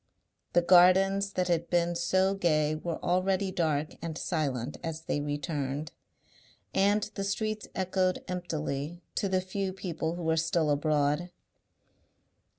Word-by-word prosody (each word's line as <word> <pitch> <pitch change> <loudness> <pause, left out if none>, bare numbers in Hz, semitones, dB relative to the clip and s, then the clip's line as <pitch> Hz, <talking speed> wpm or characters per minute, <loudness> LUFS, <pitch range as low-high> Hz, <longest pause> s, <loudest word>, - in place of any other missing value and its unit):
The 175 - +4
gardens 190 +3 +5
that 180 -1 0
had 170 -1 0
been 175 0 +2
so 185 +3 +2
gay 155 -5 +2
were 160 +1 -3
already 185 +2 +1
dark 155 -4 -1
and 165 -1 -4
silent 145 -7 -2
as 160 -1 -4
they 145 -2 -2
returned, 145 0 -3 0.8
and 200 +2 +3
the 195 - -3
streets 215 +2 -2
echoed 185 0 0
emptily 165 -2 -4
to 200 - -1
the 185 0 +2
few 190 +1 -3
people 170 -3 -3
who 175 - -6
were 160 0 +1
still 160 -2 +1
abroad. 150 +3 +1
175 Hz, 135 wpm, -29 LUFS, 155-185 Hz, 0.8 s, gardens